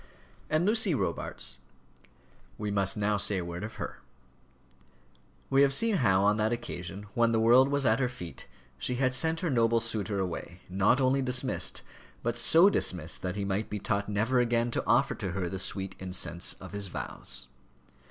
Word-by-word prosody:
And 155 Hz, +3 st, +2 dB
Lucy 210 Hz, -5 st, +3 dB
Robarts -, -, -3 dB, 1.0 s
we 105 Hz, -1 st, -3 dB
must 100 Hz, -1 st, +1 dB
now 105 Hz, 0 st, +1 dB
say 100 Hz, -1 st, +3 dB
a 90 Hz, -, -3 dB
word 85 Hz, +2 st, -6 dB
of 110 Hz, -, -7 dB
her. -, -, -6 dB, 1.5 s
We 135 Hz, 0 st, +5 dB
have 135 Hz, -1 st, +4 dB
seen 225 Hz, +1 st, +3 dB
how, 95 Hz, -, +3 dB
on 105 Hz, +1 st, +3 dB
that 110 Hz, +1 st, +1 dB
occasion, 100 Hz, -4 st, -5 dB
when 115 Hz, -1 st, +3 dB
the 115 Hz, -, +2 dB
world 120 Hz, +4 st, +6 dB
was 140 Hz, -1 st, 0 dB
at 115 Hz, +1 st, +3 dB
her 125 Hz, -2 st, +1 dB
feet, 100 Hz, -10 st, -9 dB, 0.3 s
she 125 Hz, -, -2 dB
had 130 Hz, 0 st, +1 dB
sent 160 Hz, +5 st, +2 dB
her 170 Hz, -5 st, -1 dB
noble 115 Hz, -2 st, +3 dB
suitor 110 Hz, -3 st, -1 dB
away, 90 Hz, -1 st, -4 dB
not 100 Hz, +7 st, +2 dB
only 135 Hz, +1 st, +2 dB
dismissed, 130 Hz, 0 st, -1 dB, 0.4 s
but 120 Hz, 0 st, -1 dB
so 165 Hz, +9 st, +6 dB
dismissed 90 Hz, -, -1 dB
that 90 Hz, 0 st, -3 dB
he 100 Hz, -1 st, -2 dB
might 100 Hz, +2 st, -2 dB
be 105 Hz, -, -3 dB
taught 100 Hz, 0 st, -2 dB
never 110 Hz, +5 st, +1 dB
again 120 Hz, 0 st, +1 dB
to -, -, -1 dB
offer -, -, +3 dB
to 90 Hz, -, -5 dB
her 95 Hz, -2 st, -2 dB
the 95 Hz, +2 st, -4 dB
sweet 95 Hz, 0 st, -1 dB
incense 90 Hz, -2 st, -1 dB
of 95 Hz, -, -12 dB
his 100 Hz, -1 st, -2 dB
vows. -, -, -6 dB
110 Hz, 180 wpm, -29 LUFS, 95-130 Hz, 1.5 s, world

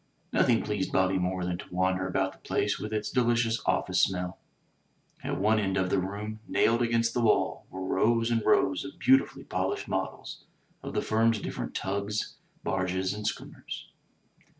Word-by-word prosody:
Nothing 115 Hz, -2 st, +3 dB
pleased 105 Hz, -3 st, -2 dB
Bobby 95 Hz, 0 st, +2 dB
more 90 Hz, 0 st, -1 dB
than 90 Hz, 0 st, -2 dB
to -, -, -7 dB
wander 95 Hz, +1 st, +1 dB
about 95 Hz, +1 st, 0 dB
the -, -, -21 dB
place -, -, 0 dB
with 105 Hz, -, -5 dB
its 105 Hz, -1 st, -2 dB
delicious 120 Hz, -2 st, +2 dB
"office 90 Hz, -1 st, +2 dB
smell." 90 Hz, -1 st, 0 dB, 0.8 s
At -, -, -2 dB
one 110 Hz, +2 st, +3 dB
end 95 Hz, -2 st, 0 dB
of 95 Hz, 0 st, 0 dB
the 100 Hz, -, +3 dB
room, 105 Hz, +3 st, -4 dB
nailed 115 Hz, +1 st, +3 dB
against 115 Hz, -1 st, +2 dB
the 120 Hz, -, 0 dB
wall, 115 Hz, -, +2 dB
were 95 Hz, -, -6 dB
rows 115 Hz, +5 st, +2 dB
and 115 Hz, -2 st, +1 dB
rows 140 Hz, 0 st, +3 dB
of 140 Hz, -, -9 dB
beautifully 135 Hz, +1 st, +3 dB
polished -, -, -2 dB
models -, -, -4 dB, 0.4 s
of -, -, -7 dB
the -, -, +1 dB
firm's 115 Hz, 0 st, +2 dB
different -, -, -5 dB
tugs, 100 Hz, +2 st, -2 dB, 0.3 s
barges 95 Hz, 0 st, 0 dB
and 105 Hz, 0 st, -4 dB
schooners. -, -, -6 dB
105 Hz, 170 wpm, -29 LUFS, 95-115 Hz, 0.8 s, Nothing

